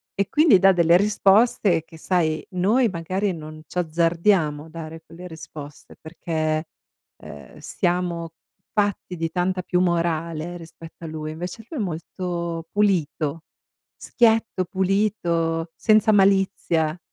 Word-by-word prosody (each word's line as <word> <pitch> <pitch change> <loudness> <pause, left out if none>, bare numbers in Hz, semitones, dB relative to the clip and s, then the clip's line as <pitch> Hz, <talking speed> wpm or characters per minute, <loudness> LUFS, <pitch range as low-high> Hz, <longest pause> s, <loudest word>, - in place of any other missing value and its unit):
E, 200 - -1
quindi, 300 - +5
dà 195 +1 +6
delle 170 -1 +4
risposte 200 -3 +3
che, 165 -1 -15
sai, 160 -4 0
noi, 215 +7 +2
magari, 185 +3 -2
non 155 -1 -9
c'azzardiamo 165 -2 +1
a 160 - -14
dare 160 0 -9
quelle 175 +2 -11
risposte 155 -3 -11
perché, 155 -1 -3 0.5
ehm, 75 -1 -12
siamo 175 -2 -2 0.5
fatti 200 -3 -1
di 165 -1 -3
tanta 185 +1 -1
più 180 0 0
morale 170 -1 -1
rispetto 165 0 -13
a - - -5
lui. 155 0 -5
Invece 180 +7 -7
lui 305 - -5
è - - 0
molto 170 -1 -4
pulito. 165 -6 0 0.5
Schietto, 225 -5 +1
pulito, 175 -4 0
senza 215 0 +4
malizia, 190 -5 +2
175 Hz, 125 wpm, -23 LUFS, 160-195 Hz, 0.5 s, dà